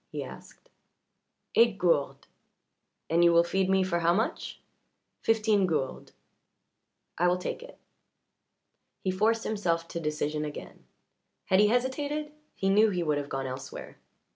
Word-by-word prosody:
he -, -, -4 dB
asked. -, -, -13 dB, 0.9 s
"Eight 230 Hz, -3 st, +4 dB
gourdes." 165 Hz, -6 st, 0 dB, 0.8 s
"And 170 Hz, +1 st, +3 dB
you 170 Hz, -, +6 dB
will 170 Hz, 0 st, +5 dB
feed 190 Hz, +2 st, 0 dB
me 190 Hz, 0 st, +3 dB
for 170 Hz, -2 st, 0 dB
how 170 Hz, +1 st, +3 dB
much?" 220 Hz, -, -2 dB, 0.6 s
"Fifteen 215 Hz, -3 st, +2 dB
gourdes." 145 Hz, -6 st, -3 dB, 1.1 s
"I 175 Hz, -, +4 dB
will 180 Hz, 0 st, +2 dB
take 180 Hz, -, -5 dB
it." -, -, -12 dB, 1.3 s
He 190 Hz, -, +1 dB
forced 220 Hz, +4 st, +1 dB
himself 170 Hz, -6 st, -1 dB
to 170 Hz, -, -4 dB
decision 150 Hz, -1 st, -2 dB
again; 150 Hz, -1 st, -8 dB, 0.6 s
had 190 Hz, -, +3 dB
he 210 Hz, -, +6 dB
hesitated 285 Hz, +6 st, -1 dB, 0.2 s
he 195 Hz, -, -2 dB
knew 210 Hz, +3 st, +5 dB
he 180 Hz, -3 st, -1 dB
would 150 Hz, -2 st, 0 dB
have 145 Hz, 0 st, -6 dB
gone 135 Hz, 0 st, -3 dB
elsewhere. 130 Hz, 0 st, -8 dB
185 Hz, 140 wpm, -28 LUFS, 165-215 Hz, 1.3 s, you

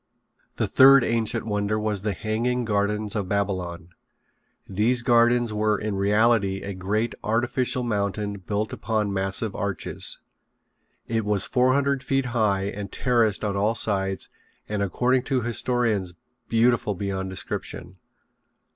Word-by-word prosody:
The -, -, 0 dB
third 135 Hz, 0 st, +7 dB
ancient 115 Hz, 0 st, 0 dB
wonder 105 Hz, 0 st, -1 dB
was 105 Hz, -2 st, -2 dB
the 105 Hz, 0 st, -1 dB
Hanging 115 Hz, +5 st, -1 dB
Gardens 105 Hz, 0 st, 0 dB
of 100 Hz, -4 st, -2 dB
Babylon. 90 Hz, -4 st, -2 dB, 0.8 s
These 115 Hz, +5 st, +1 dB
gardens 120 Hz, -1 st, +3 dB
were 105 Hz, 0 st, +1 dB
in 105 Hz, 0 st, -3 dB
reality 100 Hz, 0 st, +2 dB
a 100 Hz, -, -4 dB
great 105 Hz, +5 st, -1 dB
artificial 120 Hz, +3 st, 0 dB
mountain 105 Hz, -2 st, -2 dB
built 105 Hz, +3 st, -3 dB
upon 105 Hz, -2 st, -1 dB
massive 95 Hz, +2 st, -2 dB
arches. 100 Hz, -4 st, -3 dB, 0.9 s
It 115 Hz, -1 st, 0 dB
was 105 Hz, -2 st, +1 dB
four 130 Hz, +1 st, +2 dB
hundred 140 Hz, -1 st, +1 dB
feet 135 Hz, 0 st, 0 dB
high 105 Hz, -5 st, +1 dB
and 100 Hz, 0 st, -5 dB
terraced 115 Hz, -5 st, +1 dB
on 100 Hz, -1 st, -1 dB
all 105 Hz, +3 st, +1 dB
sides 95 Hz, -3 st, -1 dB, 0.4 s
and 105 Hz, -1 st, -2 dB
according 125 Hz, +7 st, +1 dB
to 130 Hz, -2 st, +1 dB
historians 115 Hz, -6 st, -1 dB, 0.3 s
beautiful 115 Hz, -2 st, +2 dB
beyond 95 Hz, 0 st, -3 dB
description. 95 Hz, -, -6 dB
105 Hz, 130 wpm, -24 LUFS, 100-120 Hz, 0.9 s, third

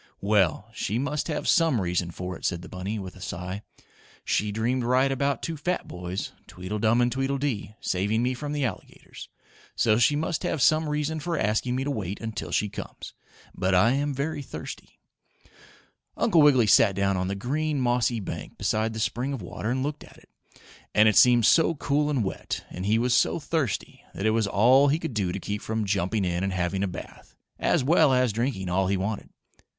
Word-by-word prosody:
"Well, 100 Hz, -1 st, +2 dB
she 110 Hz, -1 st, -2 dB
must 145 Hz, +3 st, -2 dB
have 150 Hz, -3 st, -3 dB
some 165 Hz, -8 st, +3 dB
reason 90 Hz, -2 st, -1 dB
for 90 Hz, +1 st, -6 dB
it," -, -, -13 dB
said 85 Hz, -1 st, -1 dB
the -, -, -9 dB
bunny, 95 Hz, +4 st, -4 dB
with 95 Hz, -3 st, -7 dB
a 95 Hz, -, -14 dB
sigh. 90 Hz, +4 st, -5 dB, 0.6 s
"She 105 Hz, 0 st, 0 dB
dreamed 120 Hz, +4 st, 0 dB
right 130 Hz, +3 st, +2 dB
about 140 Hz, -1 st, -1 dB
two 165 Hz, -, -3 dB
fat 175 Hz, +5 st, -2 dB
boys 90 Hz, +2 st, -5 dB, 0.2 s
Tweedledum 105 Hz, +6 st, 0 dB
and 120 Hz, 0 st, +2 dB
Tweedledee 135 Hz, -5 st, -2 dB
saving 105 Hz, +5 st, 0 dB
me 125 Hz, +1 st, +1 dB
from 145 Hz, +3 st, -5 dB
the 145 Hz, -2 st, 0 dB
alligators, 105 Hz, -7 st, -8 dB, 0.5 s
so 110 Hz, -1 st, +3 dB
she 120 Hz, +5 st, +4 dB
must 160 Hz, +2 st, -1 dB
have 160 Hz, -, -1 dB
some 155 Hz, +4 st, +3 dB
reason 150 Hz, +1 st, -1 dB
for 165 Hz, +2 st, -2 dB
asking 110 Hz, +3 st, 0 dB
me 130 Hz, -, -1 dB
to 145 Hz, -, -2 dB
wait 100 Hz, -6 st, -4 dB
until 110 Hz, -2 st, -5 dB
she 105 Hz, -, +1 dB
comes. 100 Hz, -, -8 dB, 0.4 s
But 95 Hz, 0 st, 0 dB
I 110 Hz, +6 st, +5 dB
am 145 Hz, +2 st, 0 dB
very 145 Hz, +2 st, -3 dB
thirsty." -, -, -9 dB, 1.2 s
Uncle 175 Hz, -8 st, +4 dB
Wiggily 135 Hz, -6 st, +6 dB
sat 100 Hz, -1 st, +5 dB
down 100 Hz, 0 st, +1 dB
on 90 Hz, 0 st, -1 dB
the 100 Hz, -, -2 dB
green, 145 Hz, +7 st, -1 dB
mossy 120 Hz, -1 st, +1 dB
bank 85 Hz, -6 st, -7 dB
beside 110 Hz, +1 st, 0 dB
the 110 Hz, -, -5 dB
spring 125 Hz, +4 st, -1 dB
of 130 Hz, -, -5 dB
water 105 Hz, +5 st, -5 dB
and 130 Hz, +2 st, 0 dB
looked 145 Hz, +1 st, -4 dB
at -, -, -16 dB
it. -, -, -21 dB, 0.7 s
And 105 Hz, +1 st, +6 dB
it 105 Hz, -, +3 dB
seemed 120 Hz, -3 st, +6 dB
so 165 Hz, +4 st, +4 dB
cool 145 Hz, +1 st, 0 dB
and 135 Hz, -6 st, +1 dB
wet, 95 Hz, -, -4 dB
and 95 Hz, +2 st, -5 dB
he 110 Hz, +2 st, +3 dB
was 120 Hz, +1 st, +1 dB
so 145 Hz, -, +2 dB
thirsty, 150 Hz, -, -3 dB
that 95 Hz, -, -3 dB
it 110 Hz, -, +4 dB
was 110 Hz, -2 st, +1 dB
all 125 Hz, +8 st, +5 dB
he 145 Hz, +2 st, +2 dB
could 160 Hz, -5 st, -5 dB
do 100 Hz, -5 st, -1 dB
to 100 Hz, -, -4 dB
keep 105 Hz, +2 st, -4 dB
from 110 Hz, -1 st, -2 dB
jumping 100 Hz, +1 st, 0 dB
in 90 Hz, 0 st, -1 dB
and 95 Hz, -1 st, -1 dB
having 90 Hz, +1 st, -1 dB
a 100 Hz, -, +1 dB
bath, 90 Hz, -, -10 dB, 0.2 s
as -, -, +2 dB
well 155 Hz, 0 st, +4 dB
as 125 Hz, -3 st, +2 dB
drinking 115 Hz, -4 st, -2 dB
all 95 Hz, +1 st, +1 dB
he 100 Hz, +1 st, +1 dB
wanted. 100 Hz, +3 st, -3 dB
115 Hz, 205 wpm, -26 LUFS, 100-140 Hz, 1.2 s, Wiggily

